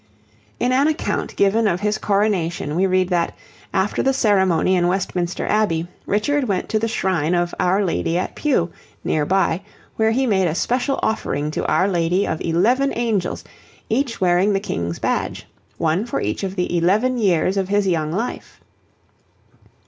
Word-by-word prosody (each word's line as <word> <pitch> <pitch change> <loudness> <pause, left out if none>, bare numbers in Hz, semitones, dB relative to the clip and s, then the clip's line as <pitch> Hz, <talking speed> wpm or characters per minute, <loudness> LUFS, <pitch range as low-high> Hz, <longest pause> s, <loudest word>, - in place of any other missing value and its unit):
In 245 - +1
an 270 +3 +3
account 315 +1 -2
given 215 +3 +3
of 180 -1 0
his 210 0 0
coronation 185 -7 0
we 190 +3 +2
read 185 -1 +1
that, 175 -2 0 0.4
after 195 +1 0
the 270 - +2
ceremony 190 -6 +3
in 175 -1 +2
Westminster 180 -1 -1
Abbey, 175 -6 +1 0.2
Richard 265 +8 +1
went 190 -3 -1
to 215 - +1
the 225 - 0
shrine 180 -6 0
of 175 0 0
Our 190 +3 +2
Lady 170 -1 0
at 180 - -2
Pewe, 245 - 0 0.3
near 150 -2 0
by, 190 -2 +1 0.4
where 220 0 +3
he 260 +4 +1
made 190 -6 +2
a 160 - -1
special 250 +7 0
offering 150 -9 -1
to - - -3
Our 185 - +2
Lady 180 +1 +1
of 160 - -3
eleven 240 +12 +2
angels, 225 -6 -1 0.5
each 245 +1 -1
wearing 185 +3 +3
the 195 - +1
King's 85 - -3
badge, - - -2 0.3
one 165 +7 0
for - - -2
each 105 - -2
of 190 0 -3
the 180 -1 -1
eleven 215 +9 +2
years 185 -2 +2
of 195 -1 -1
his 205 -1 +2
young 160 -4 0
life. 225 +8 -4
190 Hz, 170 wpm, -21 LUFS, 175-220 Hz, 0.5 s, an